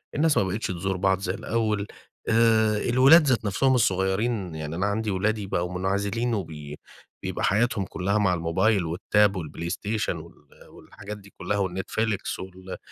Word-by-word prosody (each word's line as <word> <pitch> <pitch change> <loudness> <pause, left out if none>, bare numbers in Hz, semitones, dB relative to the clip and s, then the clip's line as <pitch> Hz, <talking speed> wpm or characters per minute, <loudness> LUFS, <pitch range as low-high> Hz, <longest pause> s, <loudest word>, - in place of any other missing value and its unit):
الناس 155 0 +3
ما - - +4
بقِتِش 95 +4 -2
تزور 95 +1 -2
بعض 95 0 +2
زي 90 -1 -2
الأول. 105 -1 -1 0.4
آآ، 110 -1 +4
الولاد 135 +8 +6
ذات 120 -4 +1
نفسهم 130 +7 +2
الصغيِّرين، 95 -2 0
يعني 80 0 -5
أنا 95 +4 0
عندي 105 +1 -1
ولادي 105 +2 -1
بقوا 90 -1 -2
منعزلين، 100 +5 -1
وبي 75 -7 -5 0.4
بيبقى - - -3
حياتهم 110 -1 +1
كلها 100 +2 -1
مع 95 -3 +2
الموبايل 90 +5 +1
والtab، 100 +5 +2
الPlayStation 90 +5 -3
وال - - -13 0.2
والحاجات 105 +1 -10
دي 100 -1 -17
كلها، 105 - -2
وال 95 -2 -2
Netflix 110 -2 -2
وال 95 0 -8
100 Hz, 155 wpm, -25 LUFS, 95-110 Hz, 0.4 s, الولاد